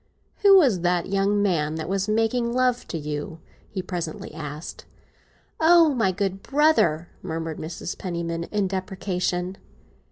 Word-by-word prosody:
"Who 400 -1 +8
was 250 - +4
the 175 0 +2
young 200 +1 +1
man 155 -6 +1
that 160 -1 -4
was 195 +1 -1
making 225 +2 +1
love 250 -1 +1
to 165 - -4
you?" 150 +1 -5 0.3
he 190 -3 -4
presently 175 -5 -5
asked. 150 0 -7 0.7
"Oh, 325 -1 +6
my 225 -7 +2
good 195 0 -2
brother!" 275 - +2
murmured 160 -2 -4
Mrs. 165 +2 -5
Penniman, 170 -2 -3
in 205 0 -1
deprecation. 185 -1 -2
185 Hz, 135 wpm, -24 LUFS, 165-220 Hz, 0.7 s, Who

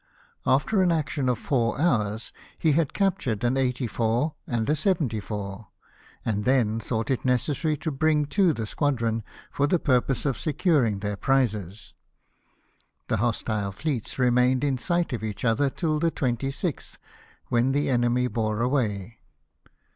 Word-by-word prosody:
After 210 -3 +3
an 180 -2 +3
,action 150 -4 0
of 125 - +1
four 120 -1 0
hours 110 -9 0 0.2
he 160 - +2
had 150 -1 +2
captured 135 - 0
an 120 +2 +2
84 125 +1 0
and 115 -2 -1
a 150 - +3
74, 110 - -2 0.6
and 105 -2 -1
then 115 -3 +2
thought 115 +2 -2
it 130 - 0
neces 130 +3 0
sary 155 -2 +1
to 160 - -3
bring 150 +1 +2
to 185 +3 +3
the 115 -7 -3
squadron, 115 -3 0 0.3
for 145 - +1
the 175 - +3
purpose 130 -3 +1
of 135 -4 0
securing 145 - +1
their 105 0 -2
prizes. 110 -8 -1 1.2
The 110 - +1
hostile 105 -2 -1
fleets 125 +2 -3
remained 125 +1 +3
in 135 -3 0
sight 175 0 0
of 115 -3 -3
each 110 +1 -4
other 130 +5 +2
till 155 +1 -1
the 165 +1 +2
26th, 135 +3 -3 0.5
when 120 +2 +2
the 145 +2 +1
enemy 120 0 +2
bore 110 -3 -1
away. 115 -5 -1
125 Hz, 145 wpm, -26 LUFS, 110-145 Hz, 1.2 s, After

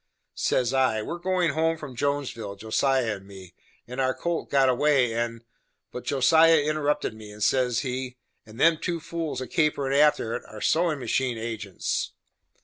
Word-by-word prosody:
Says 125 0 0
I, 130 -5 +2
"We - - -6
are 170 - -4
goin' 180 -2 +1
home 160 +2 +1
from 150 -5 -9
Jonesville, 125 -7 -2
Josiah 110 +2 0
and 95 0 -16
me, 95 -3 -12 0.3
and 125 +2 -3
our 130 0 +1
colt 170 -1 -3
got 135 -1 +4
away 130 -2 +3
and 115 0 -3 0.2
" - - -51
But 125 - -7
Josiah 160 +4 +5
interrupted 150 -3 0
me, 110 -1 -11
and 105 0 -5
says 125 +1 +2
he, 130 -1 -4 0.3
"And 110 +2 -14
them 160 0 +4
two 170 -1 -2
fools 165 -3 -4
a 130 - -5
caperin' 145 -4 0
after 145 -6 +3
it, - - -4
are 110 - -10
sewin' 165 +5 +1
machine 130 -2 -1
agents." 110 -4 -3
130 Hz, 175 wpm, -26 LUFS, 115-150 Hz, 0.3 s, Josiah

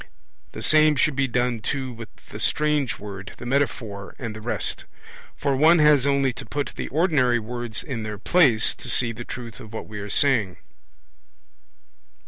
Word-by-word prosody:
The - - -7
same 155 -1 +5
should 140 +1 +1
be 135 0 +1
done 120 -1 0
too 130 +2 -3
with 115 -2 -9 0.2
the - - -8
strange 150 -4 0
word, 100 -2 -9
the - - -9
metaphor, 120 -7 -2
and 115 -4 -6
the 110 - -8
rest; 120 - -3 0.5
for 140 -2 0
one 160 +5 +6
has 150 -3 +5
only 140 -2 +2
to - - -8
put 145 0 -3
the - - -4
ordinary 145 -7 +2
words 120 0 -4
in 125 -6 -5
their 105 -1 -5
place 125 - +4
to 125 - -7
see 120 -1 +3
the 115 +1 -7
truth 120 -2 -8
of 110 0 -11
what - - -6
we 105 -1 -7
are 100 0 -6
saying. 115 - +2
125 Hz, 175 wpm, -24 LUFS, 110-140 Hz, 0.5 s, one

